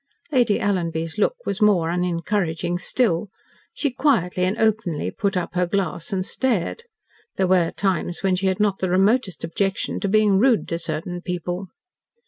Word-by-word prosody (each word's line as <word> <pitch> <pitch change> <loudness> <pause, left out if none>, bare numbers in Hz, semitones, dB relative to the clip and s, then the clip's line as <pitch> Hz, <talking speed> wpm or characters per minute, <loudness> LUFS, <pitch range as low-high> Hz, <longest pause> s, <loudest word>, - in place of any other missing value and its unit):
Lady 240 -7 +3
Alanby's 170 -3 -1
look - - +2
was 200 +3 -3
more 180 -6 +4
unencouraging 175 0 -1
still. 195 -3 0 0.4
She 285 - -1
quietly 235 - +1
and 190 +3 -1
openly 220 -8 0
put 200 -3 -1
up 180 - -3
her 180 0 +1
glass 180 -3 -2
and 185 -2 -1
stared. 260 - -1 0.5
There 190 - +1
were 180 -2 +3
times 185 -2 -2
when 190 -1 +3
she 190 +1 0
had 190 +1 0
not 205 -2 +1
the 185 - -1
remotest 195 +1 +2
objection 195 +5 -1
to 200 - -1
being 210 -2 +4
rude 245 -1 +3
to 170 - -2
certain 165 +2 -4
people. 180 +1 -4
190 Hz, 160 wpm, -23 LUFS, 175-210 Hz, 0.5 s, more